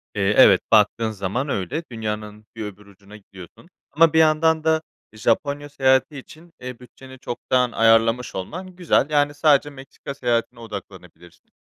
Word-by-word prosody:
Eee, 100 0 +1
evet, 100 -7 +7
baktığın 110 +1 +3
zaman 110 +7 -3
öyle, 115 - -3
dünyanın 105 -1 -6
bir 110 -2 -5
öbür 105 0 -10
ucuna 100 +1 -16
gidiyorsun 95 - -15 0.2
ama 160 +2 +4
bir 160 - +4
yandan 160 0 +3
da 160 0 +2 0.3
Japonya 140 +6 -1
seyahati 135 +1 +1
için, 160 +5 -14
eee, 125 -1 -8
bütçeni 130 +1 -15
çoktan 125 0 -1
ayarlamış 115 +2 +2
olman 180 - -7
güzel. 170 -4 +1
Yani, 145 -1 +1
sadece 145 -1 +3
Meksika 140 0 -10
seyahatine 120 -2 -2
odaklanabilirsin. 85 -6 -12
125 Hz, 145 wpm, -22 LUFS, 105-145 Hz, 0.3 s, evet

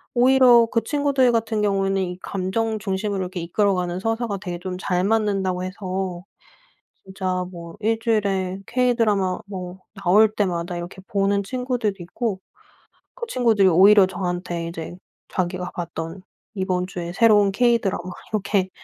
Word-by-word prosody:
오히려 250 -1 +6
그 230 - +2
친구들 280 -4 +2
같은 225 -2 0
경우에는 195 -1 +1
이 180 -1 -3
감정 215 +4 -2
중심으로 200 0 -2
이렇게 180 0 -4
이끌어가는 180 0 0
서사가 225 -1 -2
되게 180 -3 -5
좀 180 0 -5
잘 180 -1 0
맞는다고 195 -4 0
해서 185 -1 -4 0.8
진짜 185 -1 -2
뭐 170 -1 -9
1 220 +1 0
주일에 195 -4 0
K-드라마 230 -7 +1
뭐 185 -2 -7 0.2
나올 210 +5 +5
때마다 175 -4 -1
이렇게 175 +2 -7
보는 200 0 +1
친구들이 250 -2 -2
있고 195 +2 -3 0.7
그 480 -1 -6
친구들이 225 - +3
오히려 195 +3 +7
저한테 175 -2 -3
이제 170 +1 -7 0.3
자기가 180 0 -3
봤던 165 +1 -6 0.3
이번 185 -2 -1
주에 175 -2 -6
새로운 205 -2 +4
K-드라마 235 -5 +1 0.3
이렇게 195 -2 0
195 Hz, 320 characters per minute, -22 LUFS, 180-220 Hz, 0.8 s, 오히려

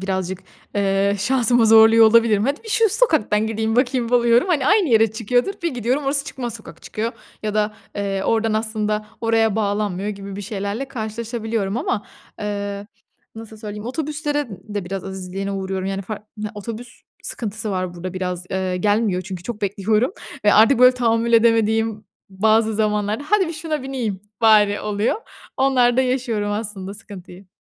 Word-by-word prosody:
birazcık, 190 -1 -2 0.4
eee, 200 0 +1
şansımı 240 +1 +3
zorluyor 225 0 +7
olabilirim. 220 -2 +4
"Hadi 280 - -1
bir 445 - -11
şu 445 +1 +3
sokaktan 315 - +2
gideyim 220 0 -1
bakayım 250 -2 +1
oluyorum. 240 +6 +4
Hani, 290 -6 +1
aynı 405 -4 +4
yere 225 -2 +4
çıkıyordur. 245 - 0
Bir 335 -6 -1
gidiyorum 250 +5 -1
orası 275 +1 0
çıkmaz 240 -6 -5
sokak - - -12
çıkıyor 225 +2 -3 0.3
ya 210 -1 -2
da, 210 0 0 0.2
eee, 195 -1 -2
oradan 225 -1 +1
aslında 215 -1 -1
oraya 225 -2 +2
bağlanmıyor 205 -2 -1
gibi 200 -1 -6
bir 205 - -5
şeylerle 205 +5 -4
karşılaşabiliyorum. 225 -3 -3
Ama, 240 -3 -2 0.3
eee, 205 -1 -4 0.5
nasıl 220 -1 -10
söyleyeyim? 210 +1 -7
Otobüslerin 295 - -3
de 200 -3 -2
biraz 195 +1 -5
azizliğine 190 +1 -5
uğruyorum. 190 -1 -3
Yani 195 0 -3
far 210 +2 -6 0.2
ya, 210 0 -4
otobüs 230 +3 -8 0.2
sıkıntısı 215 -1 -5
var 185 -2 -2
burada 180 +1 -6
biraz, 180 -1 -3
eee, 190 -1 -1
gelmiyor 205 -1 +1
çünkü 185 -1 -7
çok 225 -1 -6
bekliyorum 210 - +1 0.3
ve 205 - +5
artık, 230 +4 +6
böyle, 250 0 +7
tahammül 235 -1 +1
edemediğim 225 -1 +3 0.2
bazı 220 +3 +2
zamanlarda, 210 +4 0
"Hadi 385 -3 +2
bir - - -4
şuna 310 -2 -4
bineyim 240 -8 -3 0.2
bari." 210 -2 +5
oluyor. 210 - 0 0.4
Onlarda 260 -2 +3
yaşıyorum 245 -5 -1
aslında 205 -2 -5
sıkıntıyı. 195 -3 -12
220 Hz, 155 wpm, -21 LUFS, 200-240 Hz, 0.5 s, zorluyor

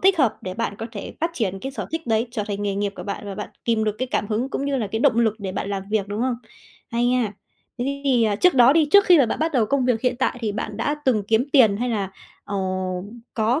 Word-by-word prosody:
thích 380 -1 +4
hợp 260 -7 +3
để 185 0 -5
bạn 230 -2 -2
có 225 - -4
thể 205 - -7
phát 330 +2 +1
triển 195 - -1
cái 270 +5 -5
sở - - -5
thích 325 -3 -3
đấy, 225 +1 +1
trở 235 -3 -2
thành 205 -1 -3
nghề 200 -1 -1
nghiệp 200 0 -1
của - - -6
bạn, 200 - -5
và 200 - -5
bạn 210 +1 -5 0.2
kìm 225 -2 +1
được 215 -1 0
cái 255 - -2
cảm 205 - 0
hứng 225 +5 -1
cũng 275 - -3
như 280 -1 0
là 230 -5 -1
cái 220 +3 -3
động 250 -4 +4
lực 225 -3 +3
để 195 -3 -4
bạn 195 - -3
làm 195 -1 -2
việc, 210 -2 0
đúng 205 +2 -3
hông? 255 0 +1 0.6
Hay 235 +1 +1
nha. 245 -4 +1 0.5
Thế 245 - -1 0.2
thì, 250 -4 +3
ờ, 210 -2 +1
trước 360 - +4
đó 250 0 +7
đi, 310 -1 +3
trước 405 +3 +7
khi 355 -4 +7
mà 270 - +5
bạn - - -2
bắt 320 +1 0
đầu 240 -6 +2
công 270 +3 +1
việc 245 -3 +1
hiện 250 0 0
tại, 260 - 0
thì 220 -3 -1
bạn 210 0 -4
đã 290 +7 0
từng 235 -6 +2
kiếm 225 +2 +3
tiền 225 -8 +6
hay 245 +4 -1
là, 205 -5 -1 0.3
ờ, 200 - -4 0.8
có 230 +5 +1
230 Hz, 285 wpm, -23 LUFS, 210-260 Hz, 0.8 s, đó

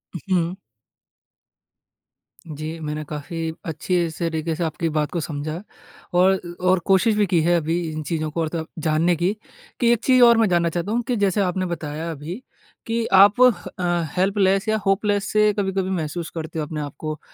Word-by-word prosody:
हुँ। 180 0 -1 1.9
जी, 155 +1 -6
मैंने 150 0 -4
काफ़ी 160 +2 -5
अच्छी 170 +2 -1
से 165 +1 -2
तरीके 160 0 -2
से 175 - -2
आपकी 165 +1 -2
बात 150 -1 0
को 175 - -2
समझा 155 +3 -4 0.5
और 185 +2 +4 0.2
और 185 0 +3
कोशिश 200 +3 +3
भी 210 -1 +3
की 170 -3 +2
है 175 +2 +3
अभी 165 +2 -1
इन 155 0 -5
चीज़ों 155 -1 -2
को 165 - -2
और 160 - -1
त 160 - -2
जानने 160 +3 +2
की, 175 +4 0 0.5
कि 235 -1 +4
एक 235 - -2
चीज़ 255 -1 +4
और 235 -1 +7
मैं 225 -2 +4
जानना 170 -1 +2
चाहता 175 +5 -3
हूँ, 240 - +1
कि 250 - +1
जैसे 200 -2 +1
आपने 185 0 0
बताया 160 -1 -4
अभी 160 - -7 0.5
कि 230 0 0
आप 200 +3 +7
ह 250 - +8 0.3
अ, 175 -1 0
हेल्पलेस 195 +2 +2
या 220 - +2
होपलेस 205 0 +1
से 210 0 +4
कभी-कभी 190 -2 -1
महसूस 170 -2 -3
करते 160 0 -5
हो 155 - -1
अपने 150 0 -5
आप 145 -2 -6
को, 155 -1 -4
175 Hz, 185 wpm, -22 LUFS, 160-195 Hz, 1.9 s, ह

